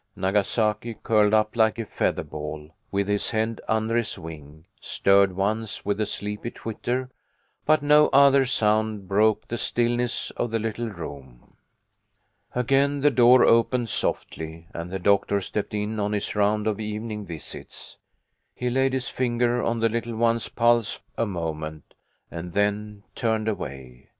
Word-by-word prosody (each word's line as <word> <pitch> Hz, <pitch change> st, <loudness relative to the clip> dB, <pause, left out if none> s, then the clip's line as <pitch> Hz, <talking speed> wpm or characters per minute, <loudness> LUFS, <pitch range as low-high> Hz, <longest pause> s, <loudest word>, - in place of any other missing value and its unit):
Nagasaki, 105 Hz, +4 st, 0 dB
curled 105 Hz, -2 st, +3 dB
up 110 Hz, 0 st, +2 dB
like 110 Hz, -1 st, +3 dB
a 115 Hz, -, -3 dB
feather -, -, -1 dB
ball, 75 Hz, 0 st, -7 dB, 0.2 s
with 100 Hz, 0 st, -1 dB
his 105 Hz, 0 st, 0 dB
head 110 Hz, 0 st, -1 dB
under 110 Hz, +1 st, 0 dB
his 115 Hz, -4 st, -1 dB
wing, 80 Hz, -2 st, -10 dB
stirred 100 Hz, 0 st, +3 dB
once, 105 Hz, +3 st, -2 dB
with 100 Hz, +1 st, 0 dB
a 105 Hz, -, 0 dB
sleepy 105 Hz, +3 st, -4 dB
twitter, 125 Hz, +3 st, -4 dB, 0.6 s
but 155 Hz, -1 st, +4 dB
no 150 Hz, +1 st, +6 dB
other 140 Hz, 0 st, +6 dB
sound 110 Hz, -4 st, 0 dB
broke 105 Hz, +2 st, +2 dB
the 120 Hz, -, -4 dB
stillness 120 Hz, 0 st, 0 dB
of 120 Hz, -, -2 dB
the 115 Hz, -, 0 dB
little 115 Hz, +1 st, -3 dB
room. 70 Hz, -, -10 dB, 1.0 s
Again 135 Hz, +3 st, +2 dB
the 145 Hz, +1 st, +4 dB
door 125 Hz, 0 st, +6 dB
opened 115 Hz, +1 st, +3 dB
softly, 80 Hz, -2 st, -3 dB
and 85 Hz, +1 st, -5 dB
the 95 Hz, -, -3 dB
doctor 100 Hz, +2 st, +2 dB
stepped 105 Hz, +2 st, -4 dB
in 105 Hz, +1 st, -2 dB
on 105 Hz, 0 st, -1 dB
his 105 Hz, 0 st, -2 dB
round 105 Hz, +1 st, +2 dB
of 110 Hz, -1 st, -1 dB
evening 105 Hz, -1 st, -5 dB
visits. 80 Hz, -2 st, -8 dB, 0.6 s
He 125 Hz, 0 st, -2 dB
laid 135 Hz, +1 st, +2 dB
his 130 Hz, -2 st, -2 dB
finger 120 Hz, -1 st, 0 dB
on 115 Hz, 0 st, -1 dB
the 115 Hz, -, +3 dB
little 115 Hz, 0 st, -3 dB
one's 115 Hz, 0 st, +1 dB
pulse 120 Hz, -1 st, +2 dB, 0.2 s
a 115 Hz, -, 0 dB
moment, 80 Hz, -5 st, -5 dB, 0.4 s
and 85 Hz, 0 st, -7 dB
then 105 Hz, 0 st, -1 dB
turned 110 Hz, -3 st, -1 dB
away. 65 Hz, -, -6 dB
110 Hz, 150 wpm, -25 LUFS, 100-120 Hz, 1.0 s, no